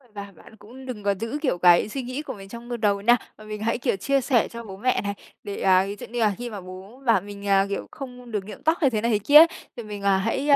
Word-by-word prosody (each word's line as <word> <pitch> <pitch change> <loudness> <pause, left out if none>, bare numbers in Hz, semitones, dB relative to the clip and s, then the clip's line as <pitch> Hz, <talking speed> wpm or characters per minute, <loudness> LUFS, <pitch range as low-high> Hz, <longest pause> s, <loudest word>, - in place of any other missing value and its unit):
Và 200 0 -7
bạn 220 - -16
cũng 235 +5 -13
đừng 240 -5 -7
có 200 0 +1
giữ, 230 +6 -3
kiểu, 260 - 0
cái 175 +3 +5
suy 270 +5 -4
nghĩ 255 +3 -5
của 305 - -6
mình 195 -1 -12
trong, 235 +2 -10
ơ, 240 - -3
đầu 205 -3 +1
nha, 240 +4 +5 0.2
mà 215 - -13
mình 215 0 -7
hãy, 230 +1 0
kiểu, 240 -3 0
chia 275 +8 +1
sẻ 240 -3 +2
cho 235 0 -9
bố 195 -4 -9
mẹ 255 +5 +1
này, 200 -1 -3 0.3
để, 200 - -6
à, 190 0 +4
ví 200 +1 -5
dụ - - -7
như 240 +1 -5
là 215 -3 +3
khi 240 +1 -5
mà 205 -4 -7
bố 190 +7 -11
bảo 225 -6 +4
mình, 200 +1 -9
à, 195 -1 +4
kiểu 200 - -4
không 250 -3 -9
được 210 -3 -2
nhuộm 215 - -10
tóc 320 +2 +2
hay 280 - +5
thế 215 -4 -1
này 235 0 +1
thế 210 - +2
kia, 300 +9 +8 0.3
thì 235 - -5
mình 210 -2 -7
hãy, 200 +8 +1
ơ, 285 - +8
215 Hz, 295 wpm, -24 LUFS, 200-245 Hz, 0.3 s, kia